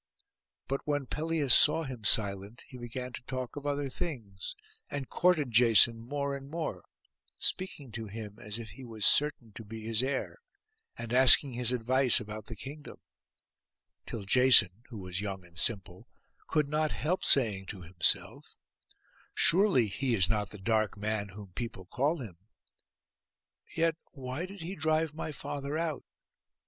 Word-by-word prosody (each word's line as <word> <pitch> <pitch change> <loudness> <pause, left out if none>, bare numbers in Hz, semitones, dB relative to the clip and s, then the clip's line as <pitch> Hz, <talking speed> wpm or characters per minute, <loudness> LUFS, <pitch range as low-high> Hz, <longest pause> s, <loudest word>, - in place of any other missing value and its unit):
But 135 +1 -2
when 145 -2 -1
Pelias 155 -1 +1
saw 155 +2 +5
him 130 -6 -8
silent, 100 +1 +2
he - - -13
began 125 +1 -7
to - - -7
talk 130 -2 -5
of 145 0 -6
other 145 0 -2
things, 120 - -6 0.3
and 140 -3 -5
courted 165 -8 +1
Jason 115 0 +6
more 140 +4 -4
and 135 0 -10
more, 160 +1 -5 0.5
speaking 145 -9 -2
to 110 0 -7
him 105 +1 -9
as 105 0 -6
if 115 -2 -8
he 120 +6 -12
was 110 -4 -2
certain 145 -6 +2
to 115 - -9
be 110 +1 -9
his 110 +1 0
heir, 135 - -3 0.6
and 120 0 -6
asking 130 +1 +6
his 120 0 +1
advice 125 +1 +4
about 105 0 -8
the 115 - -7
kingdom; 145 +7 -10 1.1
till 110 - -6
Jason, 115 -3 +6
who 115 - -9
was 90 -1 -4
young 95 -3 -6
and 85 -3 -10
simple, 95 -2 -2 0.4
could 150 -2 0
not 155 +1 -1
help 180 +5 -2
saying 105 -8 +3
to 95 -4 -8
himself, 85 0 0 0.8
'Surely 180 - +4
he 120 +4 -1
is 95 -4 +3
not 105 -2 -1
the 105 - -11
dark 110 +1 0
man 105 0 -2
whom 100 -1 -11
people 115 -5 -6
call 140 - -1
him. 110 - -9 1.4
Yet 165 -1 +1 0.2
why 135 +5 -5
did 195 -1 -11
he 170 +4 -6
drive 155 -1 0
my 155 0 -5
father 145 0 -4
out? 165 -2 -3
125 Hz, 155 wpm, -30 LUFS, 105-145 Hz, 1.4 s, Jason